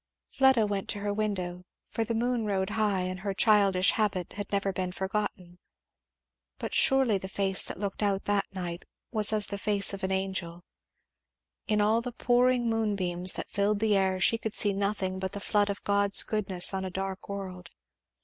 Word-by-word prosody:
Fleda 265 -5 +3
went 200 -2 -3
to 205 - -2
her 205 0 -2
window, 185 -4 -3 0.3
for 225 - -1
the 230 +1 -3
moon 240 0 0
rode 190 0 -1
high 210 -3 0
and 185 0 -4
her 195 0 -4
childish 195 -4 +4
habit 195 -5 -1
had 205 0 -7
never 200 -1 -1
been 185 -1 -3
forgotten. 190 -2 -4 1.0
But - - -6
surely 265 -7 +3
the 190 - -7
face 190 0 +1
that - - -5
looked 200 0 -4
out 200 -2 0
that 205 -1 0
night 175 -2 -5 0.3
was 215 -2 +5
as 215 -1 +3
the 200 0 -5
face 205 -1 +3
of 195 - -6
an 190 - -1
angel. 190 -3 -3 1.0
In 210 -1 +1
all 220 +3 +2
the 245 0 -6
pouring 245 0 +2
moonbeams 195 -5 0
that - - -6
filled 200 +1 0
the 215 -1 +2
air, 190 -1 +1
she 230 +5 +2
could 220 -2 -5
see 205 -1 +1
nothing 195 -1 -2
but 190 0 -4
the 205 - -5
flood 205 0 +1
of 200 - -5
God's 200 0 +3
goodness 195 -4 +2
on 190 0 -2
a 190 - -4
dark 190 +1 -5
world. 185 -3 -7
200 Hz, 190 wpm, -28 LUFS, 190-215 Hz, 1.0 s, was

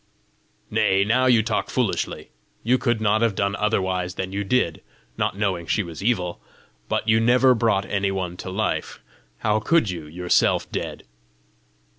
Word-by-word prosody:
"Nay, 95 +1 +3
now 125 +5 +2
you 120 -3 +5
talk - - -1
foolishly! - - -2 0.3
You 125 +3 +2
could 120 -3 0
not 110 +1 +2
have 115 -4 +2
done 100 +1 0
otherwise 95 -3 -1
than 95 0 -4
you 100 +1 -2
did, 100 -6 0 0.3
not - - -1
knowing 95 -5 -1
she 105 - +1
was 85 0 -8
evil! 90 -7 -1 0.5
But - - -1
you 110 0 +4
never 125 +3 +5
brought 110 -4 +1
any 100 -1 -1
one 95 -2 -3
to 95 - -7
life! 105 +4 -2 0.4
How 105 - +1
could 115 - +2
you, 85 -4 -7
yourself 90 +3 +1
dead?" - - -5
100 Hz, 160 wpm, -23 LUFS, 95-115 Hz, 0.5 s, you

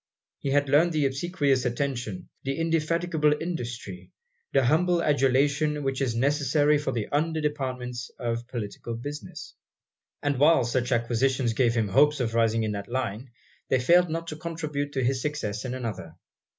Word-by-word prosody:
He 140 - -3
had 145 +1 +2
learned 155 +5 +4
the 150 -2 +2
obsequious 140 -2 +1
attention, 120 -5 -3
the 135 0 -3
indefatigable 165 -1 +1
industry, 120 - -5 0.4
the 135 -2 +3
humble 170 +5 +3
adulation 145 +2 +2
which 135 0 -1
is 125 -4 0
necessary 145 +3 +2
for 150 - -2
the 115 -3 -2
under 160 +2 0
departments 130 -5 -3
of 120 -1 -3
political 115 -1 -5
business: 145 +6 -7 0.7
and 145 -3 0
while 150 -2 +5
such 120 +2 -1
acquisitions 120 +1 +1
gave 120 -1 +2
him 110 -3 +1
hopes 150 +6 +4
of 115 -3 -1
rising 115 -1 +2
in 110 - -1
that 100 -1 -5
line, 125 -1 -3 0.4
they 130 - +3
failed 175 +7 +4
not 165 +1 -3
to 155 - -6
contribute 155 -3 -4
to 130 - 0
his 130 +1 +1
success 125 -7 -3
in 125 0 -3
another. 100 -10 -5
135 Hz, 160 wpm, -26 LUFS, 120-150 Hz, 0.7 s, while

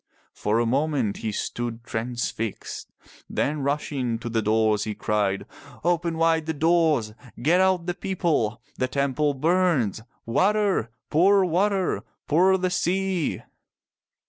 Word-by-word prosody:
For 105 +2 0
a 120 - +2
moment 135 -3 0
he 110 - -3
stood 115 +2 -4
transfixed. 115 -2 -4 0.4
Then 150 +1 -1
rushing 140 -4 -1
to 120 +1 -6
the 115 -1 0
doors 110 -1 +2
he 105 -1 -4
cried, 100 -3 0 0.4
"Open 170 -1 0
wide 165 -1 +2
the 160 - -1
doors. 160 -8 +2 0.3
Get 165 +9 +3
out 185 -2 +2
the 175 - -1
people. 155 - -1 0.2
The 130 - +1
temple 140 +2 0
burns. 155 - +1 0.2
Water! 190 - +2 0.2
Pour 190 +4 +5
water! 190 +2 +1 0.3
Pour 185 +5 +4
the 185 0 -1
sea 185 -2 0
150 Hz, 125 wpm, -25 LUFS, 115-175 Hz, 0.4 s, Pour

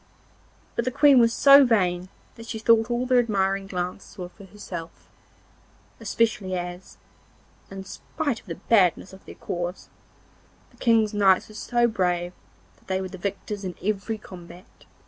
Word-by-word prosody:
But 235 - -1
the - - +1
Queen 280 +1 +5
was 230 -1 +4
so 280 +3 +7
vain 185 -7 +1 0.2
that 230 0 -12
she 230 - -5
thought 225 +1 +3
all 240 +1 -1
their 255 -1 +4
admiring 195 -4 0
glances 180 0 -5
were 180 -2 -6
for 200 +2 -15
herself, 175 -4 -9 0.9
especially 205 -5 -1
as, 175 +1 -7 0.7
in 195 0 -8
spite 235 +6 -4
of - - -24
the 165 - -5
badness 190 -1 +2
of 190 - -14
their - - -10
cause, 175 +1 -5 0.8
the - - -24
King's 225 -3 +2
knights 195 -2 +3
were - - -13
so 240 +2 0
brave 180 -4 -1 0.4
that - - -29
they 190 0 -1
were 190 -1 -5
the 190 - -10
victors 200 +1 -5
in 180 -2 -5
every 215 +2 -2
combat. 180 -2 -14
195 Hz, 160 wpm, -24 LUFS, 185-230 Hz, 0.9 s, so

